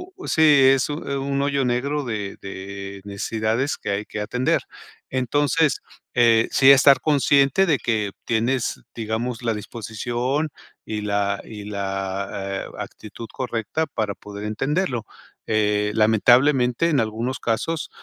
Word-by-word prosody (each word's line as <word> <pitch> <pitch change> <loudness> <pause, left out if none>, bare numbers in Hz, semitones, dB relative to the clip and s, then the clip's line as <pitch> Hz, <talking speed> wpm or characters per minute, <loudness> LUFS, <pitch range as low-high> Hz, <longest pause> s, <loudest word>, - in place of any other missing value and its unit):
u 380 - -10
sí, 160 - +1
es 135 -4 +6
un, 150 +2 -4
eh, 140 - -1 0.3
hoyo 140 -2 +1
negro 135 +4 -1
de 105 -4 -4
de 100 0 -7
necesidades 110 +6 -1
que - - -6
hay 100 +1 -1
que 105 - -5
atender. 125 +4 0 0.5
Entonces, 145 +3 +1 0.3
eh, 115 -2 +4
sí 135 0 +7
estar 140 0 +6
consciente 140 +3 +3
de 155 -6 +2
que 110 -4 -1
tienes, 120 +3 0 0.2
digamos, 115 +2 -3
la 115 - +1
disposición 120 +7 -3 0.4
y 105 -1 -3
la 100 -1 -1
y 105 -2 -9
la, 95 -1 -3 0.4
eh, - - -12
actitud 110 +2 -8
correcta 125 +5 -2
para 110 -8 -3
poder 105 0 -8
entenderlo, 135 - -1 0.4
eh, 105 -1 +1
lamentablemente, 125 +6 +4
en 145 -6 +3
algunos 115 +4 -3
casos, 130 +6 -2
115 Hz, 135 wpm, -23 LUFS, 105-135 Hz, 0.5 s, sí